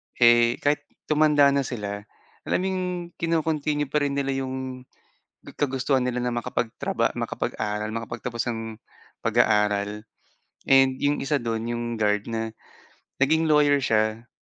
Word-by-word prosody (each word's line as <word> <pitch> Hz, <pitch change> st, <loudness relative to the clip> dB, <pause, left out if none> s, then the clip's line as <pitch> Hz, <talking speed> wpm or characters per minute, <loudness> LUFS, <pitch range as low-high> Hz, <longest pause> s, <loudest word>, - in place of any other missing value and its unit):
Eh, 120 Hz, 0 st, +5 dB
kahit 145 Hz, +1 st, +1 dB, 0.2 s
tumanda 150 Hz, -2 st, +4 dB
na 140 Hz, -, +2 dB
sila, 105 Hz, -3 st, -5 dB, 0.4 s
alam -, -, +1 dB
mo -, -, -1 dB
'yung 185 Hz, -1 st, -1 dB, 0.4 s
kino-continue 155 Hz, -3 st, 0 dB
pa 150 Hz, -, +2 dB
rin 145 Hz, -1 st, -1 dB
nila 140 Hz, -1 st, 0 dB
'yung 130 Hz, -1 st, -4 dB, 0.7 s
kagustuhan 135 Hz, -1 st, +1 dB
nila 125 Hz, 0 st, -1 dB
na 125 Hz, -1 st, -1 dB
makapagtraba 120 Hz, -1 st, -1 dB
makapag-aral, 105 Hz, 0 st, -3 dB
makapagtapos 115 Hz, +1 st, -4 dB
ng 115 Hz, -1 st, -5 dB, 0.5 s
pag-aaral 105 Hz, 0 st, +2 dB, 0.6 s
and 135 Hz, -1 st, +5 dB
'yung 145 Hz, +1 st, +1 dB
isa 140 Hz, +1 st, +1 dB
do'n 115 Hz, -2 st, -2 dB
'yung 120 Hz, 0 st, -3 dB
guard 105 Hz, -2 st, +1 dB
na 115 Hz, -1 st, -3 dB, 0.7 s
naging 160 Hz, +4 st, +3 dB
lawyer 145 Hz, -2 st, +4 dB
siya. 110 Hz, +2 st, 0 dB
125 Hz, 130 wpm, -25 LUFS, 115-145 Hz, 0.7 s, Eh